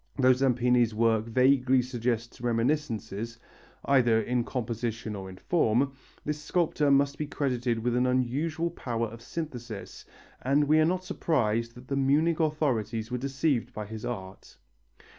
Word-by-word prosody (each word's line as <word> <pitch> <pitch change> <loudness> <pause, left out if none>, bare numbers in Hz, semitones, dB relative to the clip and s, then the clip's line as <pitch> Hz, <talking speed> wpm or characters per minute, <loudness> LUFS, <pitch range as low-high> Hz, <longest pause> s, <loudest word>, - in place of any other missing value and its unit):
Though 130 -1 +6
Zampini's 125 -3 +2
works 115 0 +2
vaguely 130 +1 +4
suggest 120 -2 -3
reminiscences 115 -3 -1 0.5
either 120 -5 +4
in 120 +2 0
composition 115 -2 -3
or 95 -1 -7
in 95 - -11
form 135 - +1 0.3
this 150 0 -2
sculptor 155 -3 +1
must 140 0 +3
be 150 - -2
credited 125 -5 -1
with 120 +2 -1
an 125 +1 +2
unusual 145 +7 0
power 120 -7 -2
of 115 +1 -9
synthesis, 120 -10 -7 0.4
and 140 +3 +3
we 155 +2 +4
are 155 - +5
not 185 +2 0
surprised 115 -9 0
that 125 +1 -13
the 140 - -2
Munich 150 +5 +2
authorities 125 -8 0
were 125 - -1
deceived 135 -1 0
by 105 - -5
his 110 +1 -8
art. 95 -5 -7
125 Hz, 145 wpm, -28 LUFS, 115-140 Hz, 0.5 s, Though